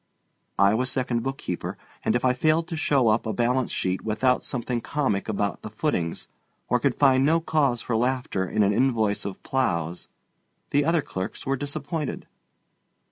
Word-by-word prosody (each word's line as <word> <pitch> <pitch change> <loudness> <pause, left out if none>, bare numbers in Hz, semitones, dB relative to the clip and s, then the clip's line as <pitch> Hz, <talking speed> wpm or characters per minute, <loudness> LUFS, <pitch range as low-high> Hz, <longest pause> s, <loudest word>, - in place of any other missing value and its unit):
I 100 +1 +5
was 125 +3 +1
second 125 -3 0
bookkeeper, 135 -8 -4 0.3
and - - +1
if 120 - +1
I 125 - +4
failed 155 +5 +2
to 165 - -3
show 140 -6 +2
up 110 +1 +1
a 110 - -1
balance 125 +1 +1
sheet 95 0 -1
without 110 +4 +1
something 120 -1 -2
comic 120 -10 -1
about 100 -1 -1
the - - -7
footings 105 - -2 0.4
or 125 - +3
could 130 +1 +1
find 135 -2 +4
no 160 +4 +4
cause 145 -7 +1
for 120 - -1
laughter 125 -4 0
in 105 - +2
an 100 +1 +3
invoice 110 -5 +1
of 100 -2 -6
plows, 90 -10 -1 0.6
the 145 0 +3
other 165 -2 +2
clerks 95 0 -5
were 135 - +1
disappointed. 145 +2 -4
125 Hz, 170 wpm, -25 LUFS, 110-140 Hz, 0.6 s, I